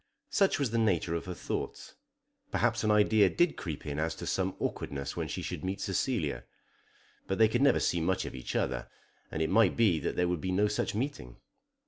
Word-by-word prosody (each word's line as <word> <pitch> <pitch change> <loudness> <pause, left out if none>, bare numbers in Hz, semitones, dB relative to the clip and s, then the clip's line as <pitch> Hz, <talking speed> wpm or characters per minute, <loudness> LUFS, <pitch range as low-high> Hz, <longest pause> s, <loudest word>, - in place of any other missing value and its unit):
Such 195 -2 +3
was 140 -6 0
the 115 - +1
nature 90 -6 +1
of 85 - -3
her 90 -1 -5
thoughts. - - -5 0.6
Perhaps 115 - +1
an 110 - +2
idea 105 -1 +5
did 175 - +2
creep 80 -5 -6
in 75 0 -3
as 80 +1 -1
to - - -7
some 95 0 -1
awkwardness 70 -1 -3
when - - -2
she - - -4
should - - -5
meet 95 +1 -2
Cecilia. 95 - -1 0.8
But 95 - -1
they 110 - +6
could 120 +4 0
never 140 - +5
see 85 - +1
much 95 +3 0
of - - -6
each 65 -2 -6
other, - - -1 0.4
and 80 - -1
it 80 - -1
might 105 -2 +4
be 105 -9 +4
that - - -2
there 90 - +2
would 90 -3 -1
be 95 - -2
no 100 +3 +3
such 105 0 -1
meeting. 120 - -3
95 Hz, 210 wpm, -30 LUFS, 85-110 Hz, 0.8 s, they